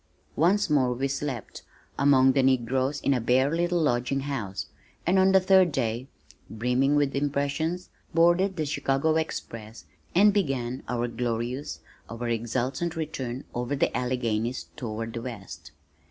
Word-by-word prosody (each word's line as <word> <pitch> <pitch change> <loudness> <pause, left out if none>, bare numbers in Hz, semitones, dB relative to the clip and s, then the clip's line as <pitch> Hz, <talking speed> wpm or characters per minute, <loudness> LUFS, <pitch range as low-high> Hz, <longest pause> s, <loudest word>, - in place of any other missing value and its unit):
Once 190 +6 +3
more 135 -5 +2
we 135 +3 -1
slept 135 -4 -4 0.4
(among 135 -1 +5
the 135 - +2
negroes 130 +2 +1
in 140 - +2
a 125 - 0
bare 130 +6 +2
little 175 +1 +1
lodging 135 -2 +1
house), 105 - -4 0.4
and 185 +3 +3
on 190 0 +5
the 190 - +6
third 185 -2 +5
day, 120 -1 -2 0.4
brimming 125 +5 +1
with 145 -2 +1
impressions, 145 +5 -1 0.2
boarded 175 +4 +3
the 155 -3 -1
Chicago 140 +2 +1
express 115 -8 -4 0.3
and 205 +3 +6
began 135 - -1
our 120 0 0
glorious, 120 +3 -3 0.3
our 115 +1 -4
exultant 130 +8 -1
return 135 -5 -4
over 125 +3 -2
the - - 0
Alleghanies, 125 -1 -1
toward 115 -4 -5
the 115 - -4
west. 100 - -8
135 Hz, 140 wpm, -27 LUFS, 120-155 Hz, 0.4 s, the